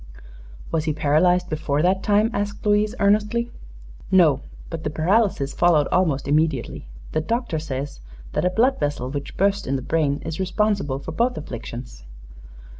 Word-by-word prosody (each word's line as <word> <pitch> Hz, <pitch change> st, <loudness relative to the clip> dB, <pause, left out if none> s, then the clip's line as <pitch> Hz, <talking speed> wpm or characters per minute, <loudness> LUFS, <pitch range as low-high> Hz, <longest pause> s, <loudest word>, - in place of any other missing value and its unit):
"Was 160 Hz, -1 st, 0 dB
he 155 Hz, -, 0 dB
paralyzed 160 Hz, +5 st, +2 dB
before 150 Hz, -1 st, -1 dB
that 190 Hz, +2 st, +2 dB
time?" 210 Hz, +3 st, +2 dB
asked 205 Hz, +2 st, -3 dB
Louise, 210 Hz, +2 st, +2 dB
earnestly. 210 Hz, +4 st, +2 dB, 0.6 s
"No; 165 Hz, -8 st, +4 dB, 0.3 s
but 165 Hz, -1 st, -5 dB
the -, -, -1 dB
paralysis 165 Hz, -2 st, +1 dB
followed 160 Hz, -5 st, +3 dB
almost 155 Hz, -8 st, +1 dB
immediately. 145 Hz, -, 0 dB, 0.2 s
The 155 Hz, -, 0 dB
doctor 230 Hz, -2 st, -1 dB
says 140 Hz, -, -5 dB, 0.3 s
that -, -, -1 dB
a 180 Hz, -, +3 dB
blood 240 Hz, +8 st, +2 dB
vessel 145 Hz, -3 st, -2 dB
which 140 Hz, -1 st, -6 dB
burst 200 Hz, +1 st, +1 dB
in 135 Hz, -, 0 dB
the 130 Hz, -, -3 dB
brain 150 Hz, -2 st, 0 dB
is 160 Hz, +1 st, -4 dB
responsible 190 Hz, -6 st, 0 dB
for 140 Hz, +3 st, -7 dB
both 240 Hz, +9 st, 0 dB
afflictions." 120 Hz, -, -7 dB
165 Hz, 155 wpm, -23 LUFS, 145-205 Hz, 0.6 s, No